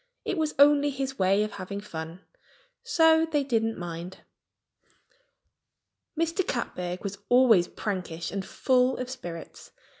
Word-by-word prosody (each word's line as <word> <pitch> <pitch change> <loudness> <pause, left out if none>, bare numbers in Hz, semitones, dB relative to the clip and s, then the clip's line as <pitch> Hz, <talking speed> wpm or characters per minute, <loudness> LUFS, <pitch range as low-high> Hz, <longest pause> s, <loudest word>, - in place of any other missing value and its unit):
It - - -1
was 315 -3 -1
only 290 +1 +6
his 270 -1 -4
way 195 +2 +3
of 215 - -4
having 200 +1 -6
fun; 165 -3 -7 0.6
so 320 -1 +4
they 295 -2 +2
didn't 225 -4 0
mind. 175 +1 -7 2.0
Mr. 330 +3 +1
Catbird 180 -7 -3
was 200 -1 -5
always 240 -8 +5
prankish 180 -6 -4
and 195 -1 -3
full 255 +5 +1
of 255 0 -5
spirits. 175 -10 -8
220 Hz, 125 wpm, -27 LUFS, 185-275 Hz, 2.0 s, only